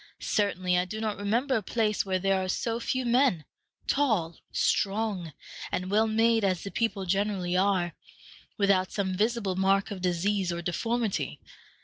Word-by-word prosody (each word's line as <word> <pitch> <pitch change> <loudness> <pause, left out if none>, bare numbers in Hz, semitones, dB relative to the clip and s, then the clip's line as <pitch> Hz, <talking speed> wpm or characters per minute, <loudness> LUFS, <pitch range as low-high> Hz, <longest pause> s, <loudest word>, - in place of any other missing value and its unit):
Certainly 185 -3 +2
I 180 - 0
do 215 +4 -6
not 215 -2 -2
remember 235 +7 +1
a 225 - +1
place 215 +1 0
where 190 -1 0
there 190 0 +1
are - - -3
so 230 +4 -1
few 255 +2 -1
men, 240 - +3 0.4
tall, 215 - +1
strong, 200 -4 0 0.4
and 185 +1 -2
well 220 +2 +3
made 225 0 +3
as 185 -3 +1
the 200 - -6
people 205 -4 -1
generally 190 -1 0
are, 185 -2 +2 0.6
without 195 -3 +2
some 190 -2 -1
visible 210 -2 0
mark 195 +2 +2
of 195 -3 -5
disease 185 +1 0
or 170 0 -4
deformity. 225 +5 -1
200 Hz, 155 wpm, -28 LUFS, 185-220 Hz, 0.6 s, men